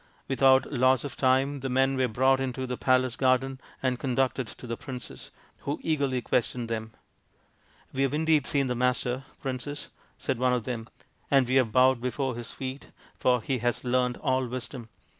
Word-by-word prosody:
Without 135 +1 +4
loss 130 -1 +3
of 145 - -6
time 135 +2 +2
the 135 +1 -3
men 135 +1 +2
were 130 -1 +2
brought 130 +3 +3
into 130 0 -2
the 125 0 -3
palace 130 -1 +2
garden 130 0 +1 0.2
and 125 -2 +1
conducted 130 -1 0
to 125 - -10
the 115 -1 -3
princess, 125 0 -8 0.3
who 145 - -3
eagerly 140 -6 0
questioned 120 -1 -1
them. 110 -1 -4 0.5
" - - -34
We 135 - -1
have 135 0 +1
indeed 155 -2 +2
seen 140 -3 +1
the 125 - 0
Master, 125 +1 0 0.2
Princess," 135 +2 -5 0.3
said - - -2
one 125 0 +3
of 125 -2 0
them, 115 -1 -5 0.2
" - - -39
and 135 -3 +4
we 130 - -1
have 125 -4 +3
bowed 130 0 +4
before 125 +1 -2
his 120 -1 -5
feet, 130 +1 -6 0.3
for 125 -3 +2
he 130 -2 -1
has 120 +1 -1
learnt 125 0 +1
all 130 -2 0
Wisdom. 125 -1 -6
130 Hz, 185 wpm, -28 LUFS, 125-135 Hz, 0.5 s, Without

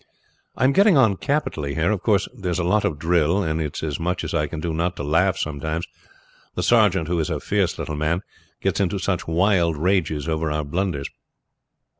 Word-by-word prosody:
"I - - -1
am 130 - +5
getting 200 -2 +5
on 110 -7 +4
capitally 80 - -2
here. 80 +5 +1
Of 105 -4 -1
course 100 -2 +2
there 95 -3 -5
is 90 - -1
a 90 - 0
lot 105 +4 +2
of 85 -7 -1
drill, 85 +4 +2
and 80 -1 -1
it 75 -2 -4
is - - -5
as 75 -1 -2
much 90 +2 -2
as 80 - -4
I 75 -3 +1
can 80 - -6
do 80 +1 -3
not 85 +3 -1
to - - -5
laugh 90 +6 +2
sometimes, 80 +1 -3 0.7
the - - -2
sergeant, 100 -8 +3
who 85 0 0
is 80 - -1
a - - -2
fierce - - 0
little 75 - -4
man, 75 +5 -1 0.4
gets - - 0
into 100 0 0
such 95 -2 -2
wild 85 -1 +2
rages 80 -3 0
over 80 -1 -1
our 75 0 -1
blunders. 80 -1 -2
85 Hz, 215 wpm, -23 LUFS, 80-95 Hz, 0.7 s, am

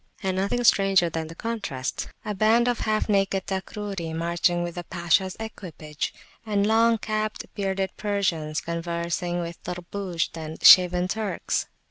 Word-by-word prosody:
And 190 -1 -1
nothing 200 +6 0
stranger 195 -5 +4
than 160 0 -3
the 165 - -10
contrasts; 200 - -4 0.2
a 210 - -2
band 220 +4 +3
of 245 -1 +1
half 215 -1 0
naked 195 -2 +1
Takruri 190 -3 -4
marching 170 +1 +1
with 175 0 -4
the 175 - -6
Pashas 175 +2 0
equipage, 165 -9 -5 0.3
and 205 -2 +1
long 225 +1 +4
capped, 215 0 -3
bearded 195 -1 -1
Persians 185 -7 -1
conversing 170 +1 -2
with 170 0 -7
Tarbushd 180 -1 -4
and 160 -1 -7
shaven 180 0 +8
Turks. 215 +1 -2
190 Hz, 140 wpm, -25 LUFS, 170-210 Hz, 0.3 s, shaven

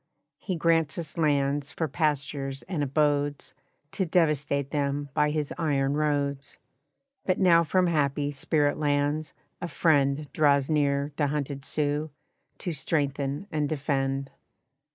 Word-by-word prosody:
He 185 - -3
grants 165 -2 +2
us 165 -3 -5
lands 145 -2 +1
for 160 - -2
pastures 140 -2 -2
and 175 -6 -3
abodes 145 0 0 0.4
To 190 - -1
devastate 145 -5 +1
them 145 -1 -1
by 150 0 +2
his 150 -1 -2
iron 140 -4 +1
roads. 145 -2 -1 0.7
But 185 - +1
now 170 -3 +5
from 180 +3 +2
happy 145 -3 +1
Spirit 145 +1 0
Lands, 145 +1 0 0.3
a 175 - -2
friend 145 -3 +2
Draws 140 -1 +3
near 140 -1 +1
the 145 - +2
hunted 140 -1 -3
Sioux, 150 +1 -1 0.5
to 180 - -3
strengthen 140 0 -1
and 150 -2 0
defend. 135 -2 -1
145 Hz, 130 wpm, -27 LUFS, 140-155 Hz, 0.7 s, now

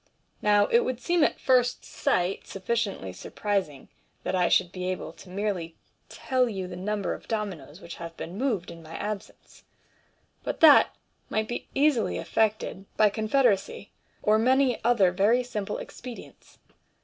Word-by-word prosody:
Now 205 -1 +4
it 470 - +4
would 255 - -2
seem 345 +1 +2
at - - +1
first 250 -1 +2
sight 180 +2 -1
sufficiently 195 - -2
surprising 190 - -3 0.4
that - - -2
I 180 -1 +2
should 180 -2 +3
be 185 -1 -4
able 185 - -5
merely 180 -4 -3 0.3
to - - -12
tell 255 -2 +1
you 190 -4 -4
the 180 0 -7
number 205 +2 -2
of - - -10
dominoes 185 -9 -4
which 170 - -9
have 165 -1 -8
been 170 - -7
moved 215 -7 -1
in 165 0 -11
my 160 0 -10
absence, 210 -1 -7 0.8
but - - -4
that 310 -3 +7 0.3
might 220 0 -1
be 240 - -5
easily 280 -5 +2
effected 215 -3 -1
by 210 -1 +5
con 215 +1 -3
federacy, 210 -6 +1 0.3
or 215 +1 +4
many 255 +1 +2
other 225 -6 +4
very 210 +7 +3
simple 210 -4 -4
expedients. 245 -2 -10
210 Hz, 155 wpm, -27 LUFS, 185-240 Hz, 0.8 s, that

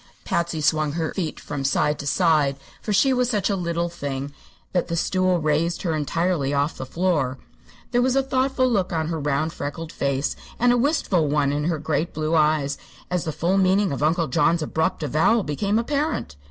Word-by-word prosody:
Patsy 170 -4 -1
swung 155 0 +1
her 160 -1 -2
feet 170 -6 -3
from 145 -2 -5
side 145 +2 +1
to 145 - -5
side, 150 -2 +2 0.2
for 215 - -3
she 260 +7 +4
was 250 -1 +1
such 210 -4 0
a - - +1
little 170 -2 -1
thing 140 -4 -5 0.4
that 180 - +1
the 170 - -2
stool 185 +1 +1
raised 155 +2 0
her 165 -4 0
entirely 155 -1 0
off 140 +2 0
the 130 - -7
floor. 155 -5 0 0.5
There 245 -1 +3
was 255 +1 +2
a 270 - +3
thoughtful 260 0 +1
look 200 -7 0
on 160 -2 -1
her 165 -1 -2
round, 150 +2 -1
freckled 160 +3 -5
face, 140 0 -1 0.2
and 245 +1 +4
a - - +3
wistful 240 - +1
one 145 -1 +1
in 145 +1 -1
her 165 -1 0
great 155 +2 -2
blue 155 +1 -1
eyes 150 -3 +2 0.3
as 180 -2 0
the 160 - -1
full 180 +6 +1
meaning 190 +1 +3
of 140 - -3
Uncle 165 +3 +2
John's 165 +5 +2
abrupt 160 +1 -1
avowal 160 - +2
became 200 +8 0
apparent. 280 - -1
165 Hz, 195 wpm, -23 LUFS, 150-190 Hz, 0.5 s, she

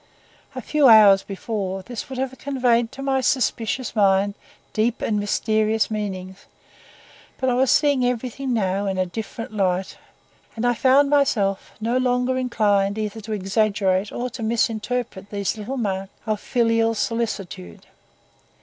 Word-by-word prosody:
A - - -5
few 300 -3 +3
hours 210 -4 +8
before, 195 -2 -4
this 240 +3 -7
would 265 - -6
have 265 0 -3
conveyed 245 -4 +1
to 275 0 -8
my 270 -1 +1
suspicious 245 -1 -1
mind 200 -1 +3 0.4
deep 225 +2 0
and 210 -2 0
mysterious 215 +1 0
meanings; 190 -3 -5 0.9
but 260 -1 +1
I - - +1
was 255 +1 +2
seeing 285 -4 +3
everything 250 +2 -2
now 200 -3 0
in 190 -1 -2
a 185 - +1
different 225 +5 -7
light, 190 -2 -1 0.6
and 230 +1 -2
I 245 - +3
found 275 +4 +3
myself 210 -9 +1
no 230 +3 0
longer 250 0 +1
inclined 210 -5 +1
either 215 0 -4
to 215 +1 -8
exaggerate 200 -1 0
or 250 +1 -4
to 245 - -8
misinterpret 225 -2 -2
these 200 0 -2
little 220 +5 -5
marks 195 -4 -3
of 215 -2 -1
filial 230 -1 +1
solicitude. 205 - -4
220 Hz, 145 wpm, -22 LUFS, 200-250 Hz, 0.9 s, hours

